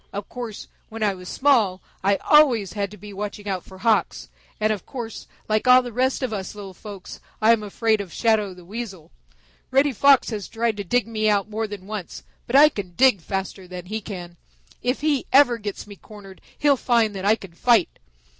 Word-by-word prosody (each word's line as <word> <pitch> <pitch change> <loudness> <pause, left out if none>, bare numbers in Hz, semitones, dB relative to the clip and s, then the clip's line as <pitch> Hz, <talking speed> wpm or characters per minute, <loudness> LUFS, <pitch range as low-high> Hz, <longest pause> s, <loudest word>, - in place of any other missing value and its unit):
Of 200 0 -6
course, 235 -4 -7 0.2
when 225 0 -5
I 205 -2 +2
was 180 -1 -10
small 230 -10 +2 0.2
I 200 +1 +3
always 240 -9 +4
had 200 -2 -2
to 210 - -12
be 205 +1 -11
watching 205 +1 -6
out 190 -3 -2
for 190 - -14
Hawks, 220 +2 0 0.3
and 215 0 +2
of 205 - -7
course, 235 -4 -7 0.2
like 215 +3 0
all 255 0 +7
the 245 -2 -7
rest 260 +3 0
of 245 -4 -2
us 195 -1 -5
little 200 -2 -9
folks, 200 -1 -10 0.2
I 220 +1 +5
am 225 - 0
afraid 215 +1 0
of 190 -4 -9
Shadow 215 -5 +1
the 180 -1 -15
Weasel. 195 -4 -7 0.6
Reddy 275 +2 +3
Fox 270 +1 +4
has 210 -3 -4
tried 225 -1 -1
to 205 - -3
dig 245 +6 +1
me 215 -1 0
out 205 0 +1
more 220 +1 -2
than 205 -3 -9
once, 205 -3 -7 0.2
but 235 - -2
I 295 +2 +9
can 190 - -7
dig 255 -6 +4
faster 190 +1 -5
than 180 -1 -8
he 215 +4 -4
can. 175 -4 -8 0.4
If 250 +4 -1
he 295 -3 0
ever 260 -4 +5
gets 205 -2 -6
me 205 -1 -11
cornered, 200 -2 -14 0.2
he'll 285 -2 +3
find 230 -4 +2
that 190 - -5
I 210 +2 +5
can 195 -6 -12
fight. 230 +1 +2
215 Hz, 210 wpm, -23 LUFS, 195-235 Hz, 0.6 s, I